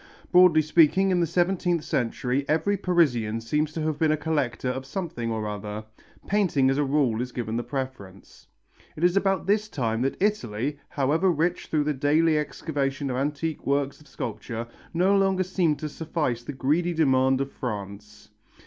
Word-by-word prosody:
Broadly 180 -3 +6
speaking, 170 +5 +4
in 180 - +2
the 170 - +2
seventeenth 175 -1 +1
century 125 -1 -1
every 160 +7 +2
Parisian 140 - +1
seems 150 +7 -1
to 160 - -3
have 155 -1 -2
been 160 -1 +3
a 155 - +2
collector 145 -5 -1
of 130 +1 -3
something 135 -5 -4
or 110 -1 -2
other. 105 +1 -5 0.4
Painting 165 -10 +2
as 135 - 0
a - - +3
rule 135 -5 +1
is 125 0 -4
given 115 -3 -4
the 120 - 0
preference. 120 -7 -7 0.5
It 155 - -6
is 175 +1 +4
about 195 -2 +1
this 210 +2 +1
time 115 - -1
that 135 +1 -1
Italy, 145 - -1
however 155 +7 +1
rich 170 +1 0
through 155 -2 +1
the 150 +1 0
daily 155 +4 +2
excavation 140 -2 -2
of 125 - -2
antique 150 +3 -2
works 140 +1 0
of 150 - -18
sculpture, 115 -1 -5 0.3
no 185 +4 +3
longer 195 -1 +2
seemed 175 -5 0
to 155 - -4
suffice 150 -5 -2
to 120 - -19
the 145 - -4
greedy 160 +7 0
demand 130 -4 +3
of 135 0 -2
France. 105 -2 -7
145 Hz, 175 wpm, -26 LUFS, 125-170 Hz, 0.5 s, Broadly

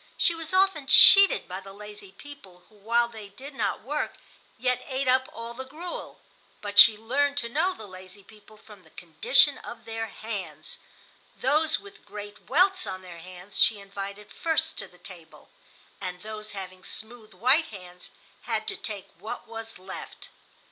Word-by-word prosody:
She 340 - +4
was 330 -1 -6
often 375 -6 +3
cheated 395 +6 +8
by 185 +1 -5
the 195 0 -12
lazy 210 -1 -10
people, 195 -8 -14
who 215 - -23
while 235 +3 +1
they 220 -3 -10
did 265 +8 -11
not 215 -6 -2
work, 295 +5 -3 0.4
yet 250 0 0
ate 265 0 -2
up 260 +1 +3
all 230 +1 -7
the 260 +2 -6
gruel. 315 +7 -8 0.4
But 205 -1 +2
she 220 -2 +10
learned 280 +6 0
to 235 -4 0
know 320 +9 +1
the 220 - -10
lazy 185 +1 -11
people 215 +1 -18
from 210 -2 -16
the 160 - -21
condition 175 - +2
of - - -10
their 225 0 -4
hands. 220 - -7 0.6
Those 315 +1 +2
with 405 +1 -15
great 205 0 -10
welts 370 +5 +3
on 185 0 -6
their 175 -2 -10
hands 180 +3 -9
she 215 -3 +4
invited 200 +1 -8
first 320 -1 0
to 195 - -5
the 180 - -21
table, 175 -3 -13 0.5
and 180 -1 -6
those 215 0 -6
having 185 -1 -8
smooth 220 -2 -6
white 260 - +4
hands 180 -3 -12 0.4
had 220 -2 -2
to - - -1
take 205 -3 -5
what 220 - -7
was 225 -2 -8
left. 190 +1 -10
220 Hz, 170 wpm, -27 LUFS, 195-275 Hz, 0.6 s, she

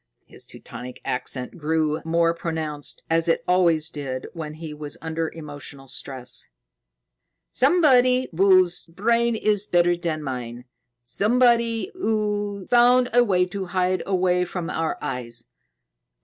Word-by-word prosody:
His - - -9
Teutonic 125 0 -9
accent 125 +4 -3
grew 155 0 0
more 165 0 +2
pronounced, 160 -3 -4
as 165 +1 +1
it 165 - +1
always 170 -3 +3
did 135 -3 -5
when 155 -3 -6
he 155 -1 -7
was 150 -1 -7
under 160 0 -3
emotional 145 -3 -10
stress. 125 -1 -4 1.0
"Somebody 255 -4 +4
whose 185 -1 +4
brain 235 +7 +1
is 210 -2 +1
better 175 0 +3
than 165 -3 -3
mine. 125 -2 -5 0.4
Somebody 235 - +2
who 210 - -1
found 245 +1 +5
a 245 0 +6
way 185 -5 +2
to 195 +1 -4
hide 185 0 0
away 180 -2 +2
from 180 -1 -4
our 160 0 -1
eyes. 120 -2 -4
175 Hz, 125 wpm, -24 LUFS, 150-210 Hz, 1.0 s, a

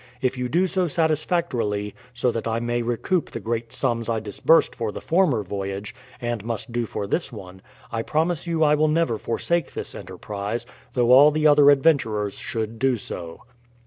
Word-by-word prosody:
If 130 -1 0
you 125 -1 -3
do 175 +8 +2
so 185 -1 0
satisfactorily, 155 - 0 0.2
so 125 0 0
that 115 0 -3
I 115 0 0
may 120 0 -1
recoup 120 +10 -1
the - - -6
great 115 +2 -3
sums 120 -2 -1
I 115 -1 +1
disbursed 110 +10 +3
for 115 -3 -3
the - - -7
former 165 - +2
voyage, 100 +2 -5 0.3
and 120 -4 -3
must 115 +2 -4
do 120 -1 -1
for 100 - -4
this 165 - -1
one, 95 -4 -10 0.3
I 115 - -1
promise 160 +6 -1
you 165 -1 +1
I 150 -1 +5
will 155 +1 +3
never 150 -8 +1
forsake 170 +9 -1
this - - -4
enterprise, 105 +3 -5 0.3
though 120 -1 +2
all 140 +4 +9
the 155 0 -1
other 145 -1 +7
adventurers 135 -9 +2
should 110 -1 -4
do 130 0 +2
so. 85 -5 -7
120 Hz, 180 wpm, -24 LUFS, 110-150 Hz, 0.3 s, all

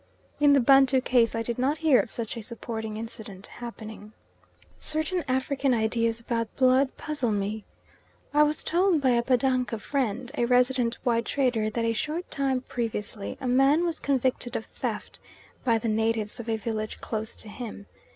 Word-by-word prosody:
In 290 -1 +6
the 280 - +6
Bantu 270 +1 +6
case 245 -3 +2
I 225 - -1
did 235 +1 -3
not 275 +4 +1
hear 310 -6 +4
of 230 - -2
such 230 +1 -3
a 230 - -5
supporting 220 -1 -5
incident 215 -3 -8
happening. 220 -3 -9 0.7
Certain 315 +3 -1
African 265 0 +1
ideas 230 +1 +1
about 230 -1 -3
blood 260 +1 +3
puzzle 290 -7 -2
me. 205 +1 -2 0.7
I 300 - +5
was 300 0 +2
told 355 -1 +3
by 265 -2 +3
a 235 -1 +3
Batanga 255 -1 +1
friend, 250 +1 -2
a 240 - +1
resident 250 -1 +2
white 235 -1 +1
trader, 245 -6 +1
that 230 +1 -2
a 230 - +1
short 305 +10 -3
time 270 -2 0
previously 225 -4 -4
a 260 - -4
man 270 +6 +4
was 335 -2 -2
convicted 260 -3 0
of 225 - -2
theft - - -5 0.4
by 230 -2 +3
the 225 - -3
natives 220 0 0
of 235 -1 -6
a 225 - +1
village 215 0 -4
close 220 0 -4
to - - -8
him. 210 -2 -7
240 Hz, 170 wpm, -27 LUFS, 225-270 Hz, 0.7 s, In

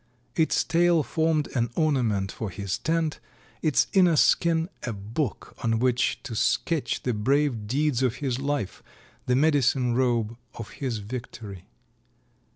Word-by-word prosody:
Its 160 -1 +2
tail 170 -1 +3
formed 160 0 0
an 120 -2 +1
ornament 120 - +1
for 110 - -5
his 100 0 -4
tent, 160 -1 -1 0.4
its 155 -3 +3
inner 180 -4 +5
skin 165 +2 +3
a 120 - -3
book 110 +5 -4
on 115 -1 +1
which 125 +1 +1
to 115 - -6
sketch 140 +3 0
the 125 - 0
brave 120 0 +1
deeds 140 +1 +1
of 125 -2 +1
his 130 -2 -2
life, 140 -7 -2 0.5
the 125 - +3
medicine 135 -4 +3
robe 120 -3 +1 0.2
of 115 - -7
his 125 -6 -3
history. 110 -6 -7
130 Hz, 140 wpm, -26 LUFS, 115-155 Hz, 0.5 s, inner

